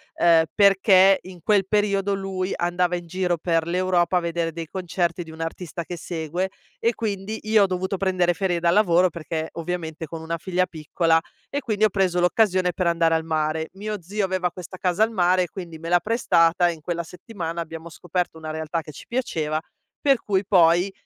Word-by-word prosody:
ehm, 165 Hz, -1 st, +5 dB
perché 195 Hz, -1 st, +6 dB
in 180 Hz, -2 st, -12 dB
quel 200 Hz, -3 st, +3 dB
periodo 200 Hz, -1 st, +1 dB
lui 190 Hz, -1 st, -3 dB
andava 175 Hz, 0 st, 0 dB
in 175 Hz, -1 st, -5 dB
giro 180 Hz, 0 st, -1 dB
per 165 Hz, 0 st, 0 dB
l'Europa, 180 Hz, 0 st, +1 dB
a -, -, +4 dB
vedere 170 Hz, -1 st, -2 dB
dei 165 Hz, -1 st, -6 dB
concerti 175 Hz, -1 st, -2 dB
di 160 Hz, -, -12 dB
un 160 Hz, -, -9 dB
artista 170 Hz, +1 st, -5 dB
che 175 Hz, -, -6 dB
segue, 170 Hz, +3 st, -3 dB, 0.3 s
e 230 Hz, +1 st, +1 dB
quindi 210 Hz, 0 st, -3 dB
io 215 Hz, -1 st, +4 dB
ho -, -, +5 dB
dovuto 185 Hz, +1 st, -2 dB
prendere 180 Hz, -2 st, +1 dB
ferie 175 Hz, -1 st, -1 dB
dal 170 Hz, 0 st, +3 dB
lavoro 185 Hz, -3 st, +4 dB
perché 160 Hz, 0 st, -4 dB
ovviamente 165 Hz, -1 st, -4 dB
con 160 Hz, +1 st, -8 dB
una 165 Hz, +1 st, -3 dB
figlia 185 Hz, +1 st, 0 dB
piccola. 160 Hz, +1 st, +1 dB, 0.3 s
E 285 Hz, -, -2 dB
quindi 215 Hz, -4 st, -1 dB
ho 215 Hz, -, +3 dB
preso 185 Hz, -2 st, +1 dB
l'occasione 180 Hz, -1 st, +2 dB
per 180 Hz, 0 st, -1 dB
andare 165 Hz, -1 st, +2 dB
al 160 Hz, -, 0 dB
mare. 160 Hz, 0 st, -1 dB
Mio 210 Hz, 0 st, -5 dB
zio 200 Hz, +4 st, -2 dB
aveva 185 Hz, -2 st, -1 dB
questa 185 Hz, +1 st, -9 dB
casa 180 Hz, +3 st, +1 dB
al 225 Hz, -, +1 dB
mare, 185 Hz, -2 st, +3 dB
e 175 Hz, -, -5 dB
quindi 170 Hz, -3 st, -8 dB
me 165 Hz, -, -7 dB
l'ha 175 Hz, 0 st, +5 dB
prestata 175 Hz, -5 st, +3 dB
e 170 Hz, -, -2 dB
in 155 Hz, -, -14 dB
quella 170 Hz, +1 st, -3 dB
settimana 170 Hz, -1 st, -6 dB
abbiamo 165 Hz, +1 st, -8 dB
scoperto 175 Hz, 0 st, -3 dB
una 155 Hz, -1 st, -7 dB
realtà 160 Hz, +1 st, -3 dB
che 150 Hz, -, -11 dB
ci 145 Hz, -, -12 dB
piaceva, 160 Hz, -11 st, -1 dB, 0.4 s
per 275 Hz, -3 st, +4 dB
cui 195 Hz, -1 st, +1 dB
poi 175 Hz, 0 st, +4 dB
175 Hz, 200 wpm, -23 LUFS, 165-190 Hz, 0.4 s, perché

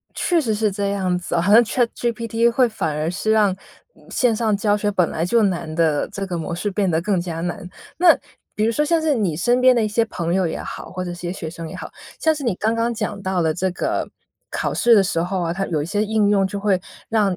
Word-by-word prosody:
确 345 Hz, -2 st, +1 dB
实 225 Hz, -7 st, 0 dB
是 210 Hz, 0 st, +1 dB
这 200 Hz, 0 st, -2 dB
样 190 Hz, -3 st, 0 dB
子 175 Hz, -1 st, -5 dB
哈。 170 Hz, -, +2 dB
好 200 Hz, +4 st, +2 dB
像 230 Hz, +3 st, +8 dB
ChatGPT 235 Hz, -1 st, 0 dB
会 245 Hz, +1 st, +3 dB
反 160 Hz, -9 st, -3 dB
而 155 Hz, +2 st, -1 dB
是 200 Hz, +4 st, -2 dB
让 210 Hz, -3 st, +3 dB, 0.4 s
嗯， -, -, -21 dB
线 245 Hz, -3 st, +2 dB
上 215 Hz, -2 st, +1 dB
教 205 Hz, 0 st, +1 dB
学 205 Hz, 0 st, 0 dB
本 185 Hz, -4 st, +2 dB
来 160 Hz, -, -2 dB
就 230 Hz, +6 st, +3 dB
难 170 Hz, -5 st, -1 dB
的 160 Hz, -3 st, +1 dB
这 200 Hz, -1 st, -4 dB
个 180 Hz, -2 st, -4 dB
模 165 Hz, 0 st, -4 dB
式 175 Hz, +5 st, -2 dB
变 195 Hz, -1 st, 0 dB
得 160 Hz, -1 st, +1 dB
更 185 Hz, 0 st, 0 dB
加 170 Hz, -2 st, -4 dB
难。 175 Hz, +1 st, -4 dB, 0.3 s
那 350 Hz, -1 st, +6 dB, 0.4 s
比 215 Hz, -, +1 dB
如 230 Hz, -, +2 dB
说 300 Hz, +6 st, +1 dB
像 330 Hz, +2 st, +2 dB
是 315 Hz, -2 st, +1 dB
你 195 Hz, -, 0 dB
身 245 Hz, +8 st, +2 dB
边 255 Hz, 0 st, +6 dB
的 230 Hz, -2 st, +2 dB
一 -, -, +1 dB
些 225 Hz, +2 st, +1 dB
朋 170 Hz, -5 st, -2 dB
友 185 Hz, -3 st, +1 dB
也 -, -, -4 dB
好， -, -, -7 dB
或 185 Hz, 0 st, -4 dB
者 175 Hz, -, -4 dB
一 -, -, -6 dB
些 175 Hz, 0 st, -5 dB
学 165 Hz, -4 st, -6 dB
生 165 Hz, 0 st, -7 dB
也 -, -, -8 dB
好， -, -, -7 dB, 0.3 s
像 315 Hz, -1 st, +2 dB
是 290 Hz, -, -7 dB
你 235 Hz, -7 st, 0 dB
刚 220 Hz, +3 st, 0 dB
刚 230 Hz, +1 st, 0 dB
讲 210 Hz, -3 st, -4 dB
到 190 Hz, -1 st, -1 dB
的 160 Hz, -2 st, +1 dB
这 185 Hz, +2 st, -1 dB
个， -, -, -2 dB, 0.4 s
考 -, -, -2 dB
试 235 Hz, -2 st, +5 dB
的 200 Hz, -, +6 dB
时 170 Hz, -3 st, 0 dB
候 185 Hz, +1 st, -2 dB
啊， 170 Hz, -1 st, -1 dB
它 195 Hz, +2 st, -2 dB
有 160 Hz, -4 st, -1 dB
一 145 Hz, -, -3 dB
些 205 Hz, +4 st, 0 dB
应 215 Hz, -1 st, +2 dB
用， 200 Hz, -1 st, +3 dB
就 200 Hz, +1 st, -3 dB
会 200 Hz, -2 st, +1 dB, 0.3 s
让 205 Hz, -5 st, +1 dB
200 Hz, 310 characters per minute, -21 LUFS, 175-225 Hz, 0.4 s, 像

